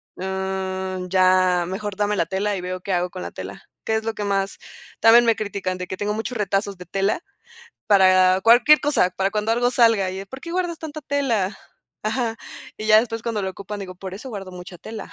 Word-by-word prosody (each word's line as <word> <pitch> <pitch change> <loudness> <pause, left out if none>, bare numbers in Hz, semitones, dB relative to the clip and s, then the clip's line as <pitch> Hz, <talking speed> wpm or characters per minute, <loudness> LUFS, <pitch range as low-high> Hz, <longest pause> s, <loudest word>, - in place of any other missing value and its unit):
mm, 190 -1 -3
ya 185 -1 +3
mejor 200 +2 -4
dame 210 0 +1
la - - +1
tela 200 +1 -1
y 185 - -4
veo 185 0 -4
qué 195 - -3
hago 180 0 0
con 185 0 -7
la - - -6
tela, - - -8 0.2
que 220 - +1
es 220 0 -2
lo 225 - -1
que 210 - -4
más, 195 -1 -1 0.4
también 235 +1 +7
me 230 - +4
critican, 195 -3 -3
de 180 - -5
que 190 - -5
tengo 205 +1 -1
muchos 225 +2 -4
retazos 200 -1 -1
de 180 - -10
tela 195 - 0 0.7
para 185 -2 +5
cualquier 245 +8 +6
cosa, 280 -11 +2
para 195 +1 -1
cuando 215 +2 0
algo 245 +1 +2
salga 225 -6 +3
y 185 - -6
de 195 - -7
por 265 +4 -10
qué 335 - -8
guardas 350 -2 -2
tanta 310 -1 -7
tela, 230 -10 0 0.5
ajá, 225 +1 -1 0.4
y 215 - -6
ya 215 0 +7
después 225 0 -2
cuando 225 -3 -2
lo 190 - -2
ocupan, 200 +2 -7
digo, 185 -2 -7
por 185 0 -8
eso 230 +7 -8
guardo 195 -5 -7
mucha 180 0 -10
tela, 220 +4 -8
200 Hz, 220 wpm, -22 LUFS, 185-225 Hz, 0.7 s, también